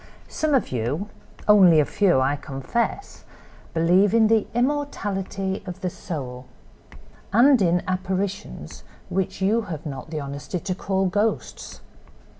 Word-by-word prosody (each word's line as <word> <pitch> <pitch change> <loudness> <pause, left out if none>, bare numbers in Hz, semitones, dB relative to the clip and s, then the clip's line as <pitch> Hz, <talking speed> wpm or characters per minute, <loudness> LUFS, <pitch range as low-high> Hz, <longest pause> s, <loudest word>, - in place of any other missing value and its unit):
"Some 310 -2 0
of 260 - 0
you—only 170 - +2
a 150 - +4
few, 185 -6 +2
I 135 +2 +2
confess—believe 175 - -1
in 220 -2 +5
the 225 -2 +3
immortality 205 -8 -2
of 180 +1 -7
the 180 - -2
soul, 130 -8 -6 0.8
and 245 +4 +5
in 175 -1 +2
apparitions 185 +1 -3 0.3
which 190 0 -2
you 220 +4 +3
have 160 -2 -6
not 135 -1 -6
the 155 -1 -3
honesty 140 +5 -5
to 185 - -3
call 190 +1 -1
ghosts. 205 +4 -2
190 Hz, 120 wpm, -24 LUFS, 155-210 Hz, 0.8 s, in